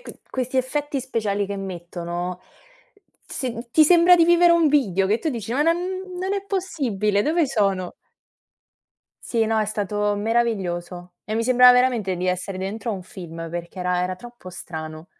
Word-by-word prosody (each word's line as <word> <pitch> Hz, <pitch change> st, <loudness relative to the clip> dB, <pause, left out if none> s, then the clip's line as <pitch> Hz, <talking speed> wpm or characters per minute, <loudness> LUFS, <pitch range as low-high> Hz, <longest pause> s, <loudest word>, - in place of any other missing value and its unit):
c -, -, -10 dB, 0.2 s
questi 255 Hz, 0 st, -3 dB
effetti 280 Hz, +2 st, -1 dB
speciali 210 Hz, -5 st, -1 dB
che 200 Hz, 0 st, -5 dB
mettono, 175 Hz, -1 st, -5 dB, 0.9 s
sin 235 Hz, -2 st, -5 dB
ti 310 Hz, +4 st, +6 dB
sembra 350 Hz, +2 st, +6 dB
di 335 Hz, -, +5 dB
vivere 345 Hz, 0 st, +5 dB
un 335 Hz, -2 st, +4 dB
video 195 Hz, -10 st, +2 dB
che 215 Hz, +4 st, +1 dB
tu 320 Hz, -, -2 dB
dici: 230 Hz, -5 st, -4 dB
“Ma 265 Hz, -, 0 dB
non 330 Hz, +3 st, +3 dB, 0.4 s
non 380 Hz, +2 st, -2 dB
è 400 Hz, -1 st, -1 dB
possibile, 250 Hz, -, -1 dB
dove 320 Hz, +3 st, +2 dB
sono?”. 195 Hz, -8 st, 0 dB, 1.4 s
Sì, 230 Hz, -2 st, +1 dB
no, 220 Hz, 0 st, +1 dB
è 215 Hz, -, 0 dB
stato 205 Hz, 0 st, -1 dB
meraviglioso, 185 Hz, -6 st, -2 dB
e 215 Hz, -, -4 dB
mi 230 Hz, -, 0 dB
sembrava 250 Hz, 0 st, +7 dB
veramente 240 Hz, -7 st, +1 dB
di 180 Hz, +1 st, -3 dB
essere 180 Hz, +1 st, -2 dB
dentro 205 Hz, +5 st, -5 dB
a -, -, -1 dB
un 190 Hz, -, -7 dB
film 165 Hz, -3 st, -8 dB
perché 170 Hz, +2 st, -7 dB
era 180 Hz, 0 st, 0 dB
era 185 Hz, 0 st, -2 dB
troppo 240 Hz, -2 st, -12 dB
strano. 160 Hz, -2 st, -8 dB
215 Hz, 170 wpm, -23 LUFS, 185-260 Hz, 1.4 s, sembrava